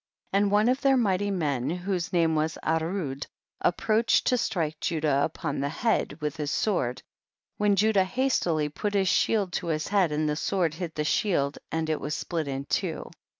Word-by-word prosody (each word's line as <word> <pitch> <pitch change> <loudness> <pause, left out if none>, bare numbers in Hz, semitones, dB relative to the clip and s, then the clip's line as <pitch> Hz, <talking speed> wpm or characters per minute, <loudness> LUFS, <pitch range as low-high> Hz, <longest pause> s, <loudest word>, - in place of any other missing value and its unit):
38. 195 - +3
And 205 -1 +1
one 210 +2 +4
of 260 +3 +2
their 270 -1 +4
mighty 205 -3 +1
men 145 -9 -1
whose 180 0 -2
name 165 -2 +2
was 155 +1 0
Arud 160 -3 -1 0.3
approached 220 +5 +2
to 250 - +3
strike 165 -10 -1
Judah 150 -4 +1
upon 155 -2 -3
tlic 140 +1 -1
head 225 +8 0
witii 150 +1 -3
liis 145 - -2
sword, 135 - 0 0.5
when 205 -1 +3
Judah 200 -1 +3
hastily 185 - +1
put 205 +8 -3
his 195 -1 +2
shield 190 0 +2
to 175 - -2
his 155 -1 -1
head, 195 -5 +3
and 155 +1 0
the 150 - 0
sword 170 0 0
hit 165 -1 -5
the 150 - -1
shield, 145 -2 0
and 160 0 -1
it 155 -1 -1
was 150 +2 -2
split 165 -3 -3
in 135 0 -3
two. - - -2
170 Hz, 190 wpm, -27 LUFS, 150-200 Hz, 0.5 s, one